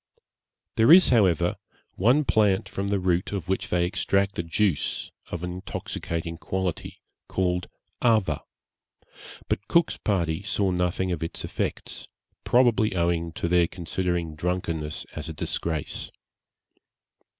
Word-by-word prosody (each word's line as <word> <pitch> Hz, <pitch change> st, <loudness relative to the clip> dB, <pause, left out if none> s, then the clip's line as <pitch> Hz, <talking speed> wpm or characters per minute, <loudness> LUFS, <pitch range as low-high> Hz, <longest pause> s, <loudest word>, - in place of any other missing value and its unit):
There 115 Hz, +5 st, +6 dB
is, 185 Hz, +2 st, +9 dB
however, 90 Hz, -8 st, +3 dB, 0.4 s
one 125 Hz, +10 st, +3 dB
plant 105 Hz, -5 st, +3 dB
from 100 Hz, +1 st, -3 dB
the 100 Hz, 0 st, +1 dB
root 90 Hz, -1 st, 0 dB
of 95 Hz, -5 st, -4 dB
which 95 Hz, +1 st, -1 dB
they 90 Hz, 0 st, +2 dB
extract 100 Hz, +2 st, 0 dB
a -, -, +3 dB
juice 85 Hz, 0 st, 0 dB, 0.2 s
of 85 Hz, 0 st, -5 dB
an 90 Hz, -, -3 dB
intoxicating 85 Hz, -2 st, -5 dB
quality, 95 Hz, -2 st, -3 dB, 0.3 s
called 90 Hz, -1 st, -1 dB, 0.3 s
Ava, 110 Hz, -, +3 dB, 1.1 s
but 105 Hz, -, -2 dB
Cook's 170 Hz, -1 st, +3 dB
party 85 Hz, -4 st, 0 dB
saw 100 Hz, -1 st, 0 dB
nothing 90 Hz, +1 st, 0 dB
of 85 Hz, -3 st, -2 dB
its 80 Hz, -, -3 dB
effects, -, -, -4 dB, 0.4 s
probably 120 Hz, -5 st, +3 dB
owing 85 Hz, -1 st, +1 dB
to 85 Hz, -, -2 dB
their 85 Hz, -1 st, +4 dB
considering 85 Hz, -1 st, -2 dB
drunkenness 80 Hz, -2 st, -3 dB
as 80 Hz, 0 st, -5 dB
a -, -, -4 dB
disgrace. 80 Hz, +1 st, -3 dB
90 Hz, 130 wpm, -26 LUFS, 85-100 Hz, 1.1 s, is